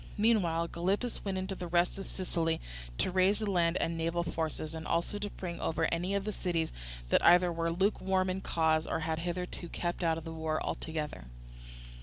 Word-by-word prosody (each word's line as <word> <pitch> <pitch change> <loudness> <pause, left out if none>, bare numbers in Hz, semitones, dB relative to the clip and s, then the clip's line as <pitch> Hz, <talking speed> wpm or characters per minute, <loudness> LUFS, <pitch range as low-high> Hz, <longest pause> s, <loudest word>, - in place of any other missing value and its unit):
Meanwhile 180 -7 +3
Gylippus 195 +8 -1
went 195 -2 -2
into 190 +1 -2
the 180 -2 -5
rest 175 +2 +2
of 195 - -5
Sicily 165 -3 -1 0.4
to - - +1
raise 190 +2 +4
land 175 -4 +2
and 165 - 0
naval 165 +1 0
forces, 160 -1 -3
and 160 -1 -5
also 170 +5 0
to 205 0 -3
bring 175 -3 -6
over 160 0 +1
any 180 +4 0
of 200 - 0
the 215 - -2
cities 170 -4 -1 0.4
that - - +4
either 175 0 +7
were 165 0 0
lukewarm 190 +1 +1
in 185 0 0
the - - -5
cause 160 -1 +2
or 160 - -1
had 160 0 -1
hitherto 175 0 -4
kept 175 +1 -2
out 165 -1 +2
of 165 - -6
the 165 0 -6
war 160 -1 -1
altogether. 150 - -4
175 Hz, 195 wpm, -32 LUFS, 165-190 Hz, 0.4 s, either